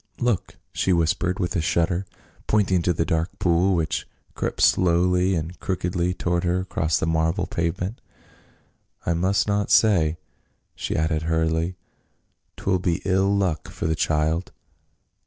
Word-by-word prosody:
" - - -26
Look 105 - -2
!" - - -48
she 95 - 0
whispered 90 +2 +1
with 90 0 -2
a 85 - +1
shudder, 85 +3 0 0.4
pointing 95 -4 +2
to 90 - +1
the 80 -1 0
dark 80 +1 -1
pool 90 +2 +2
which 80 -3 -1 0.3
crept - - -3
slowly 90 +1 +3
and 80 +2 -4
crookedly 90 -1 -1
toward 85 -1 -1
her 90 +1 +1
across 80 -4 0
the - - 0
marble 80 +1 +1
pavement. 90 +6 -3 0.5
" - - -37
I 85 - +1
must 95 +4 +1
not 100 -1 0
stay," 85 -8 +4 0.6
she - - -4
added 80 0 0
hurriedly; 80 +2 0 0.4
" - - -48
'twill 95 -1 0
be 90 -1 -1
ill 95 +1 +2
luck 85 -6 -1
for - - -6
the 80 - +2
child." 80 +2 0
85 Hz, 155 wpm, -24 LUFS, 80-95 Hz, 0.6 s, stay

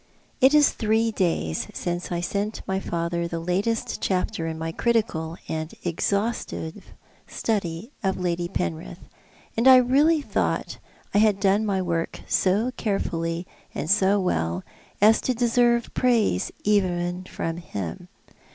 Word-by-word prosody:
It 265 +3 +6
is 295 -1 +6
three 225 0 +1
days 165 - -1
since 175 0 -3
I 175 -1 -1
sent 205 +4 -2
my 190 0 0
father 170 -1 -2
the 170 - -4
latest 195 +7 -1
chapter 185 -2 -1
in 160 0 -4
my 160 0 -3
critical 175 -7 0
and 160 0 -3
exhaustive 200 0 -2 0.4
study 200 0 -2
of 190 -3 0
Lady 175 -1 -1
Penrith, 80 - -4 0.5
and 230 +3 +2
I 260 - +10
really 280 +6 +4
thought - - -1 0.3
I 205 - +4
had 210 -2 +4
done 200 +2 +2
my 190 -2 0
work 170 -2 -2
so 205 +7 +2
carefully 170 -4 -2 0.3
and 150 - -3
so 200 0 +4
well 85 - -1 0.4
as 220 +1 +6
to 255 - 0
deserve 235 0 +2
praise 230 - +2
even 180 -3 +1
from 165 -2 -4
him. 125 - -6
190 Hz, 135 wpm, -25 LUFS, 170-220 Hz, 0.5 s, I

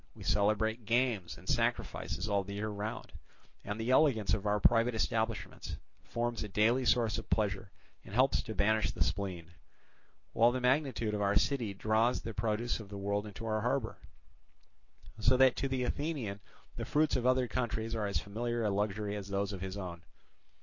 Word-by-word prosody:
We - - -10
celebrate 110 +3 +1
games 115 -7 +1
and - - -15
sacrifices 90 +7 -1
all 100 -1 +1
the 100 +1 -7
year 105 +1 -2
round, 105 +1 -5 0.5
and 105 +2 -4
the 115 +3 0
elegance 130 -7 +4
of 105 0 0
our 105 0 +2
private 115 +2 +4
establishments 110 -2 -2 0.3
forms 120 0 -2
a - - -4
daily 115 +6 +2
source 115 -4 +2
of - - -10
pleasure 100 -2 0 0.3
and 95 - -9
helps 130 +2 +4
to 110 -3 -7
banish 110 +2 +2
the - - 0
spleen; 90 -4 -3 0.8
while 115 +2 +5
the 130 - -2
magnitude 125 -4 +1
of 105 - -1
our 100 0 +2
city 115 -2 +1
draws 110 +4 +2
the 115 +1 -5
produce 110 +3 -1
of 105 -3 -10
the 100 - -7
world 100 +1 -1
into 105 +2 -8
our 110 -1 0
harbour, 120 0 -1 1.2
so 120 +4 +4
that 130 -1 +6
to 135 - 0
the 130 -1 -1
Athenian 130 -8 -2 0.4
the - - -3
fruits 150 0 +2
of 125 -1 +1
other 130 -1 +3
countries 115 -1 -2
are 110 -2 -1
as 100 - -1
familiar 120 +3 -2
a 105 - +1
luxury 105 +1 -1
as 100 -2 -5
those 100 0 -1
of 95 - -6
his 95 +1 -4
own. 90 -3 -6
110 Hz, 185 wpm, -32 LUFS, 100-120 Hz, 1.2 s, that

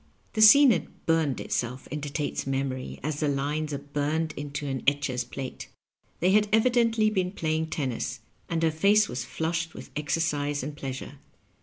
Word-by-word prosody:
The 215 - 0
scene 260 +5 +9
had - - -3
burned 160 -5 +1
itself 125 +2 -3
into 145 0 -4
Tate's 145 -2 -2
memory 135 -1 -3
as 150 0 -2
the 150 - +1
lines 145 +2 -1
are 140 - -2
burned 150 +3 -2
into 145 0 -5
an 135 -2 -3
etcher's 140 -3 +1
plate. 130 +2 -7 0.5
They 180 +2 +4
had 210 +1 +4
evi 220 +4 +4
dently 225 -3 +2
been 185 -3 +1
playing 160 -3 -1
tennis, 135 -6 -3 0.3
and 165 -1 -1
her 160 - +3
face 200 +7 +4
was 125 +1 -4
flushed 165 0 -2
with - - -10
exercise 145 -2 -1
and 145 +2 -5
pleasure. 135 0 -6
150 Hz, 170 wpm, -27 LUFS, 140-170 Hz, 0.5 s, scene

